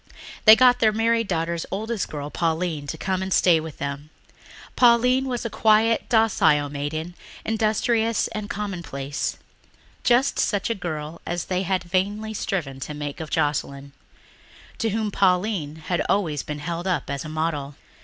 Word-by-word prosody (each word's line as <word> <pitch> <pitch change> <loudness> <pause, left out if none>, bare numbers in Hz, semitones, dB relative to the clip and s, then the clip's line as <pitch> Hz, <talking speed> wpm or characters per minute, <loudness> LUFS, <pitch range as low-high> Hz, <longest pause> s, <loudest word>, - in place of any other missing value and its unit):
They 220 0 +11
got 250 +1 +5
their 220 -1 +4
married 230 +1 +1
daughter's 170 -1 -2
oldest 220 +1 -3
girl, 145 -1 -6
Pauline, 165 -3 -1
to 160 - -4
come 190 +2 -2
and 190 0 -4
stay 175 -3 +5
with 160 -2 -8
them. 140 +1 -5 0.7
Pauline 250 +2 +4
was 245 -2 -3
a - - -1
quiet, 220 +2 +3
docile 160 -10 +3
maiden, 150 +4 -4 0.3
industrious 225 +1 +1
and 210 -1 -5
commonplace 170 -9 -4 0.7
just 250 +3 +3
such 205 +2 0
a - - +2
girl 160 -5 -5
as 175 0 -2
they 185 0 -1
had 190 -1 -1
vainly 200 +5 -1
striven 155 -10 -3
to 150 +3 -6
make 145 +1 -5
of 160 -2 -6
Joscelyn, 140 -1 -1 0.9
to 225 - +1
whom 215 0 -1
Pauline 185 -5 +1
had 175 - 0
always 165 -8 +1
been 150 - -6
held 170 +4 -4
up 180 - -1
as 140 -1 -3
a 155 - -7
model. 155 -3 -2
180 Hz, 155 wpm, -24 LUFS, 150-220 Hz, 0.9 s, They